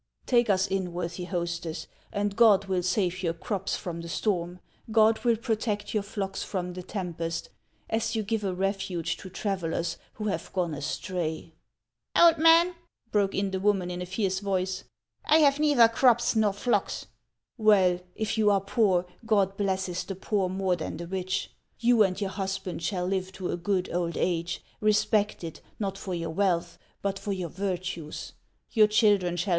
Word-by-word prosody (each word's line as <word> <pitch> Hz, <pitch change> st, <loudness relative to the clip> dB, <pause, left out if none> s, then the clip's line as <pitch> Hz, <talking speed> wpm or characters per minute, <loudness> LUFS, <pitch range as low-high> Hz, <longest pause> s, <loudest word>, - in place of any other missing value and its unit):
Take 240 Hz, -3 st, +3 dB
us 190 Hz, -1 st, +3 dB
in, 190 Hz, -2 st, -2 dB
worthy 175 Hz, 0 st, -4 dB
hostess, 170 Hz, -2 st, -3 dB, 0.3 s
and 205 Hz, -1 st, -1 dB
God 210 Hz, -4 st, +6 dB
will 190 Hz, -2 st, 0 dB
save 185 Hz, 0 st, 0 dB
your 170 Hz, -2 st, -1 dB
crops 195 Hz, +3 st, -2 dB
from 170 Hz, -2 st, -5 dB
the 170 Hz, -, -8 dB
storm, 180 Hz, -2 st, -1 dB, 0.3 s
God 220 Hz, 0 st, +4 dB
will 235 Hz, -2 st, +3 dB
protect 215 Hz, -2 st, -2 dB
your 215 Hz, -, +2 dB
flocks 200 Hz, -1 st, -4 dB
from 180 Hz, -2 st, -3 dB
the 180 Hz, -, -6 dB
tem 180 Hz, -2 st, -4 dB
pest, 165 Hz, 0 st, -4 dB, 0.4 s
as 225 Hz, 0 st, -1 dB
you 220 Hz, -, 0 dB
give 220 Hz, +1 st, -1 dB
a 195 Hz, -, 0 dB
refuge 190 Hz, -3 st, -1 dB
to 190 Hz, -, -9 dB
travellers 175 Hz, -4 st, -2 dB, 0.2 s
who 215 Hz, -, -6 dB
have 205 Hz, -, -2 dB
gone 180 Hz, -4 st, 0 dB
astray! 160 Hz, +2 st, -3 dB, 0.2 s
" -, -, -61 dB
" -, -, -8 dB
Old 335 Hz, -2 st, +7 dB
man," 330 Hz, +2 st, +6 dB, 0.4 s
broke 200 Hz, -2 st, +2 dB
in 195 Hz, -1 st, 0 dB
the 190 Hz, -, -1 dB
woman 190 Hz, -3 st, +1 dB
in 180 Hz, 0 st, -4 dB
a 180 Hz, -, -4 dB
fierce 190 Hz, 0 st, -1 dB
voice, 190 Hz, -1 st, -2 dB, 0.2 s
" 115 Hz, 0 st, -36 dB
I 310 Hz, -, +6 dB
have 285 Hz, -2 st, +4 dB
neither 290 Hz, -6 st, +6 dB
crops 240 Hz, 0 st, +3 dB
nor 215 Hz, -2 st, +3 dB
flocks." 235 Hz, +5 st, 0 dB, 0.3 s
" -, -, -55 dB, 0.2 s
"Well, 190 Hz, -5 st, +5 dB, 0.2 s
if 220 Hz, 0 st, -2 dB
you 210 Hz, -1 st, +5 dB
are 200 Hz, -1 st, +4 dB
poor, 195 Hz, -3 st, +2 dB, 0.2 s
God 200 Hz, -3 st, +2 dB
blesses 190 Hz, -3 st, -1 dB
the 195 Hz, +1 st, -6 dB
poor 195 Hz, 0 st, 0 dB
more 190 Hz, -1 st, 0 dB
than 160 Hz, -2 st, -5 dB
the 170 Hz, -, -6 dB
rich. 185 Hz, +1 st, -2 dB, 0.3 s
You 235 Hz, -1 st, +4 dB
and 190 Hz, -2 st, +3 dB
your 200 Hz, -2 st, -2 dB
husband 190 Hz, -3 st, -3 dB
shall 180 Hz, +1 st, -1 dB
live 190 Hz, 0 st, -1 dB
to 185 Hz, -1 st, -4 dB
a -, -, 0 dB
good 180 Hz, +1 st, -1 dB
old 170 Hz, -2 st, -1 dB
age, 170 Hz, -1 st, -1 dB, 0.2 s
respected, 210 Hz, -5 st, +1 dB, 0.2 s
not 195 Hz, -2 st, -2 dB
for 190 Hz, -2 st, -4 dB
your 165 Hz, -1 st, -3 dB
wealth, 175 Hz, -1 st, 0 dB, 0.2 s
but 195 Hz, -1 st, -1 dB
for 205 Hz, -, -3 dB
your 180 Hz, -3 st, -3 dB
virtues; 180 Hz, -3 st, -4 dB, 0.4 s
your 215 Hz, -2 st, +6 dB
children 205 Hz, -5 st, +3 dB
shall 175 Hz, +4 st, -1 dB
190 Hz, 185 wpm, -28 LUFS, 180-210 Hz, 0.4 s, Old